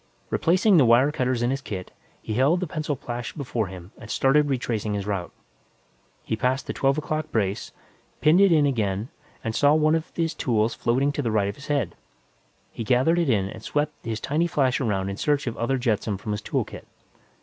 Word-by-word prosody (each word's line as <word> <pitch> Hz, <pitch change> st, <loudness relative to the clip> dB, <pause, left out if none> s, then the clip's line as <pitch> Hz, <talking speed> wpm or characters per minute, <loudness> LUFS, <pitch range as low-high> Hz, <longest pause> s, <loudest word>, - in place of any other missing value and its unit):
Replacing 185 Hz, +3 st, +3 dB
the 140 Hz, -, +6 dB
wire 120 Hz, +5 st, +5 dB
cutters 125 Hz, -4 st, 0 dB
in 120 Hz, -, +1 dB
his 135 Hz, +1 st, -2 dB
kit, 95 Hz, -8 st, -6 dB, 0.3 s
he 110 Hz, -, -3 dB
held 140 Hz, +10 st, +3 dB
the 185 Hz, -, -1 dB
pencil 155 Hz, -2 st, -3 dB
flash 120 Hz, -1 st, -6 dB
before 125 Hz, -7 st, -2 dB
him 90 Hz, 0 st, -10 dB
and 110 Hz, -, -11 dB
started 145 Hz, +5 st, +3 dB
retracing 115 Hz, -5 st, -1 dB
his 100 Hz, -1 st, -3 dB
route. 100 Hz, -4 st, -3 dB, 0.9 s
He -, -, -2 dB
passed 125 Hz, +5 st, 0 dB
the -, -, -4 dB
twelve 135 Hz, +1 st, +1 dB
o'clock 155 Hz, 0 st, -3 dB
brace, 100 Hz, -3 st, -1 dB, 0.5 s
pinned 160 Hz, +5 st, +5 dB
it 200 Hz, -2 st, +6 dB
in 155 Hz, -3 st, +5 dB
place 140 Hz, -, +3 dB
again 105 Hz, 0 st, -2 dB, 0.3 s
and 115 Hz, -, -2 dB
saw 145 Hz, +5 st, +4 dB
one 155 Hz, 0 st, +3 dB
of 165 Hz, 0 st, -1 dB
his 165 Hz, -1 st, 0 dB
tools 115 Hz, -2 st, 0 dB
floating 135 Hz, +4 st, +1 dB
to 145 Hz, -, -2 dB
the 120 Hz, -, -1 dB
right 105 Hz, -2 st, +1 dB
of 100 Hz, -, -6 dB
his 140 Hz, -, -12 dB
head. 135 Hz, -, 0 dB, 0.8 s
He 115 Hz, -, -5 dB
gathered 130 Hz, +9 st, +3 dB
it 165 Hz, -5 st, +1 dB
in 100 Hz, -5 st, +2 dB
and 110 Hz, -, -9 dB
swept 145 Hz, +5 st, -1 dB
his 110 Hz, -1 st, -3 dB
tiny 155 Hz, +9 st, 0 dB
flash 135 Hz, -6 st, +1 dB
around 100 Hz, -5 st, 0 dB
in 100 Hz, -, -5 dB
search 145 Hz, -1 st, +1 dB
of 120 Hz, -, -3 dB
other 130 Hz, +3 st, 0 dB
jetsam 110 Hz, -4 st, 0 dB
from 105 Hz, +2 st, -5 dB
his 105 Hz, 0 st, -2 dB
tool -, -, -1 dB
kit. -, -, -11 dB
125 Hz, 215 wpm, -25 LUFS, 110-150 Hz, 0.9 s, the